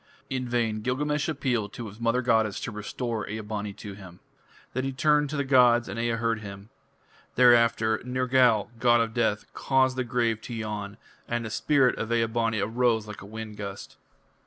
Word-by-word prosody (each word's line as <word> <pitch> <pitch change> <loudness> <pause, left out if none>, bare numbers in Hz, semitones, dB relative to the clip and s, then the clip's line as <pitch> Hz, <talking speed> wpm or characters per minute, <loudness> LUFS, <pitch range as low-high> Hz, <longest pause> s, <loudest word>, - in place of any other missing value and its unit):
In 130 -2 -2
vain 115 -3 0
Gilgamesh 150 +6 -1
appealed 125 -8 -1
to 115 - -6
his 105 +2 -12
mother 115 +2 +1
goddess 110 -4 +2
to - - -4
restore 110 +1 -4
Ea 110 +1 -4
bani 105 -1 -4
to 105 0 -9
him. 95 -3 -12 0.5
Then 130 - -1
he 135 - -2
turned 150 +2 +2
to 150 - -3
the 140 - +1
gods, 125 -3 +4
and 115 - -5
Ea 115 0 0
heard 115 -1 0
him. 100 0 -10 0.7
Thereafter 115 -2 +4
Nergal, 125 -3 +2
god 120 0 +4
of 115 -1 0
death, 110 -3 0
caused 130 -1 +1
the 130 - +1
grave 120 -3 0
to 120 - -7
yawn, 105 -2 -5 0.3
and 120 -1 -2
the 110 - -5
spirit 135 +1 +2
of 115 0 -3
Ea 115 -1 +3
bani 115 -1 -1
arose 115 -1 +1
like 105 0 -9
a 100 - -10
wind 110 0 -8
gust. 100 -1 -7
115 Hz, 185 wpm, -27 LUFS, 110-125 Hz, 0.7 s, gods